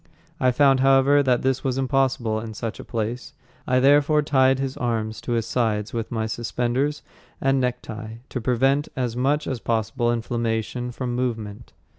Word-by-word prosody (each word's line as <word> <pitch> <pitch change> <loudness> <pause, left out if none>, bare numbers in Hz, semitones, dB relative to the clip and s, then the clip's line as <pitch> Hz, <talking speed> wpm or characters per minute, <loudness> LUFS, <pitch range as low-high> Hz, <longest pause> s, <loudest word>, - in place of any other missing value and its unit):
I 130 -3 +3
found, 135 +1 +4
however, 135 +2 +5
that 125 -3 +1
this 130 -1 0
was 130 -1 -1
impossible 130 -4 +1
in 110 -1 -7
such 115 +1 -5
a - - -7
place. 115 +2 -4 0.3
I 130 0 +3
therefore 145 +3 +4
tied 135 -2 +3
his 135 0 -3
arms 110 -2 -2
to 120 - -3
his 115 -2 0
sides 110 -3 -1
with 115 -2 -3
my 110 -2 -1
suspenders 120 +5 -1 0.4
and 135 0 +2
necktie, 115 -3 -4
to 125 - -4
prevent 135 +5 +2
as 125 -3 -2
much 140 +4 +1
as 130 -3 -3
possible 115 +1 0
inflammation 120 +1 -2
from 125 0 -4
movement. 115 -3 -4
125 Hz, 165 wpm, -23 LUFS, 115-135 Hz, 0.4 s, however